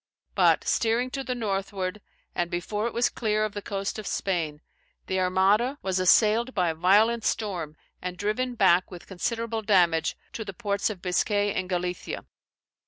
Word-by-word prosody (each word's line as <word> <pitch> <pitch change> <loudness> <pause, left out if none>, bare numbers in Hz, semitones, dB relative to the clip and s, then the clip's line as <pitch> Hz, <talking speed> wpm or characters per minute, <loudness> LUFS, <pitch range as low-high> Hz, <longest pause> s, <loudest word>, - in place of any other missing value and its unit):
But - - +4
steering 235 +3 +1
to 270 0 -3
the 250 -1 -3
northward, 195 -3 -3 0.3
and 175 -1 -1
before 205 +5 -2
it 235 - -5
was 240 +1 +3
clear 215 -2 0
of 215 - -5
the 205 - -5
coast 200 +1 -3
of 215 - -6
Spain, 160 -6 -2 0.4
the 190 - -1
Armada, 195 +8 +2
was 190 -1 0
assailed 220 +6 +4
by 180 -3 +2
a - - -4
violent 210 +7 +3
storm, 175 -10 -2 0.2
and 180 0 -5
driven 240 +5 -1
back 185 -4 +4
with 180 -2 -10
considerable 225 +4 -3
damage 175 -6 +3 0.2
to 225 - -4
the 195 - -7
ports 200 -1 -1
of 195 -5 -7
Biscay 205 +2 +1
and 185 0 -3
Galicia. 180 -1 -3
200 Hz, 170 wpm, -26 LUFS, 180-220 Hz, 0.4 s, But